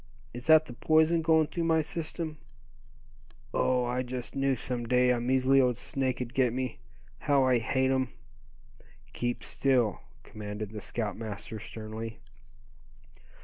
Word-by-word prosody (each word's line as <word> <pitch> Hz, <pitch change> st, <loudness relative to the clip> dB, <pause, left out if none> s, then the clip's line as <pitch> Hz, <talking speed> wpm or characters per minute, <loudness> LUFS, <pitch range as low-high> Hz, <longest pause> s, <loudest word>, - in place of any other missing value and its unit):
Is 120 Hz, +4 st, -8 dB
that 160 Hz, 0 st, +7 dB
the 125 Hz, -, -9 dB
poison 160 Hz, +5 st, +3 dB
going 160 Hz, -1 st, +4 dB
through 170 Hz, +2 st, -3 dB
my 160 Hz, -1 st, +3 dB
system? 160 Hz, -1 st, -4 dB, 1.1 s
Oh! 125 Hz, -1 st, +2 dB
I 125 Hz, +1 st, -1 dB
just 125 Hz, 0 st, -6 dB
knew 135 Hz, -1 st, +2 dB
some 120 Hz, -1 st, -4 dB
day 125 Hz, +1 st, +4 dB
a 120 Hz, -, +1 dB
measly 130 Hz, +2 st, +3 dB
old 125 Hz, -2 st, +2 dB
snake'd 130 Hz, -2 st, -2 dB
get 125 Hz, -3 st, +2 dB
me. 130 Hz, 0 st, -3 dB, 0.4 s
How 140 Hz, -2 st, +3 dB
I 130 Hz, -2 st, +4 dB
hate 130 Hz, +3 st, +1 dB
'em." 130 Hz, -1 st, +1 dB, 1.0 s
"Keep 120 Hz, 0 st, -2 dB
still!" 125 Hz, -7 st, +1 dB, 0.2 s
commanded 105 Hz, 0 st, -6 dB
the 105 Hz, -1 st, -7 dB
scoutmaster, 110 Hz, 0 st, -4 dB
sternly. 110 Hz, +1 st, -7 dB
125 Hz, 135 wpm, -29 LUFS, 120-135 Hz, 1.1 s, that